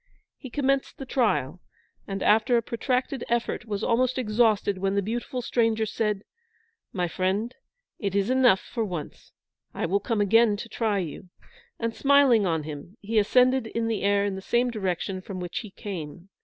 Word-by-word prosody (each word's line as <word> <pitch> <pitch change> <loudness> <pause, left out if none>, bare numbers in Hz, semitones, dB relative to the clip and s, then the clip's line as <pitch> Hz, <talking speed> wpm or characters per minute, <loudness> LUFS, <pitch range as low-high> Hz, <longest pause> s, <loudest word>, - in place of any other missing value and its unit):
He 260 - -8
commenced 275 +1 0
the 270 - -7
trial, 180 - 0 0.5
and 195 -1 -3
after 225 +3 +4
a 230 - 0
protracted 250 +2 -1
effort 235 -2 -1
was 210 -1 -3
almost 255 +2 +1
exhausted 215 -4 +2
when 195 +1 0
the 200 - +2
beautiful 240 +4 -3
stranger 225 -2 +1
said, 210 -2 -1 0.7
"My 180 -2 -1
friend, 195 +7 -1 0.5
it 200 -2 -2
is 200 +4 +1
enough 250 -7 +4
for 230 - -3
once; 175 -7 -6 0.4
I - - -1
will 190 +4 +1
come 220 +1 -2
again 210 +1 +4
to 230 - -7
try 220 -3 -1
you"; 180 0 -5 0.5
and, 230 -1 -3
smiling 275 -7 +4
on 160 -3 0
him, 155 +7 -8
he 220 +2 +1
ascended 250 +3 +3
in 230 +1 -2
the 225 -3 -1
air 200 0 +2
in 200 - -1
the 190 - -6
same 240 +5 +1
direction 190 -3 -2
from 185 0 -7
which 175 -1 -4
he 215 - -8
came. 180 -3 -7
215 Hz, 175 wpm, -26 LUFS, 195-240 Hz, 0.7 s, after